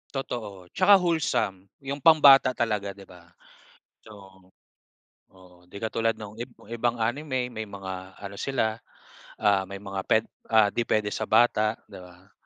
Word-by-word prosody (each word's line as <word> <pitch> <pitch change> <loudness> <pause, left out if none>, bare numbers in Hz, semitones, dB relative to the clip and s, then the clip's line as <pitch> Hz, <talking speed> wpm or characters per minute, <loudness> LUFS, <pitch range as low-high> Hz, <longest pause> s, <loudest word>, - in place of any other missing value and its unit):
Totoo. 105 -9 -6
'Tsaka 195 +2 +6
wholesome. 160 - 0 0.2
'Yong 140 +1 -4
pambata 140 -4 +6
talaga, 105 -4 -2
'di 100 - -13
ba? 90 -2 -17 0.8
Oo, 95 -3 -15 0.9
oo. 90 -1 -18
'Di 90 - -11
katulad 115 0 0
nong 105 +1 -10
ib 120 - -4 0.2
ibang 120 0 -1
anime 125 +2 -2
may 110 -2 -6
mga 95 -1 -8
ano 100 0 -9
sila, 110 -5 -1 0.6
ah, 100 -3 +2
may 100 0 -7
mga 95 -1 -5
puwed 110 0 +3 0.3
ah, 110 -2 +5
'di 120 - -1
puwede 105 -1 0
sa - - -3
bata, 110 -1 +3 0.2
'di - - -10
ba? 90 +2 -18
110 Hz, 150 wpm, -26 LUFS, 95-120 Hz, 0.9 s, Tsaka